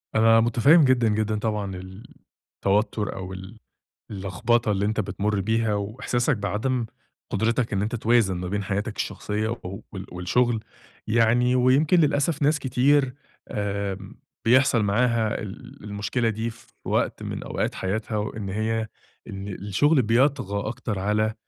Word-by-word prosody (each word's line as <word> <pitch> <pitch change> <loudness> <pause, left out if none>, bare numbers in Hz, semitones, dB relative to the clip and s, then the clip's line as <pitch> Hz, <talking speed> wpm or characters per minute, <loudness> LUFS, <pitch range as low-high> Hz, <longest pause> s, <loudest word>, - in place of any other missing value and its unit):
أنا 115 +1 +6
مُتفهم 120 +8 +5
جدًا، 125 -3 +3
جدًا 110 0 0
طبعًا 105 -3 -2
ال 95 +3 -10 0.5
التوتر 105 +1 0
أو 95 0 -6
ال 95 +4 -10 0.5
اللخبطة 105 +4 0
اللي 100 0 0
أنت 110 +1 -1
بتمر 105 0 -1
بيها، 110 +1 +1
وإحساسك 120 +5 -1
بعدم 115 +4 -1 0.5
قدرتك 115 0 0
إن 95 - +1
أنت 110 +4 -2
توازن 115 -4 +2
ما 90 - -4
بين 100 +2 -2
حياتك 105 +3 -2
الشخصية 105 +1 -2
وال 95 0 -8
والشغل، 110 +6 0 0.4
يعني 120 +3 +3
ويمكن 135 +7 +4
للأسف 145 0 +1
ناس 150 +1 +3
كتير 135 +1 +2 0.3
آآ، 100 -2 -2 0.5
بيحصل 125 -1 +4
معاها 115 +2 +1
ال 120 +6 -9
المشكلة 105 +3 -1
دي 110 +1 -2
في 120 +1 -14 0.2
وقت - - 0
من - - -5
أوقات - - -2
حياتها، 110 +3 -2
وإن 105 -1 -4
هي 110 +2 -1 0.4
إن 95 +1 -6
الشغل 105 - +2
بيطغى 115 -3 +1
أكتر 105 -3 -4
على 105 +2 +1
110 Hz, 135 wpm, -25 LUFS, 100-120 Hz, 0.5 s, أنا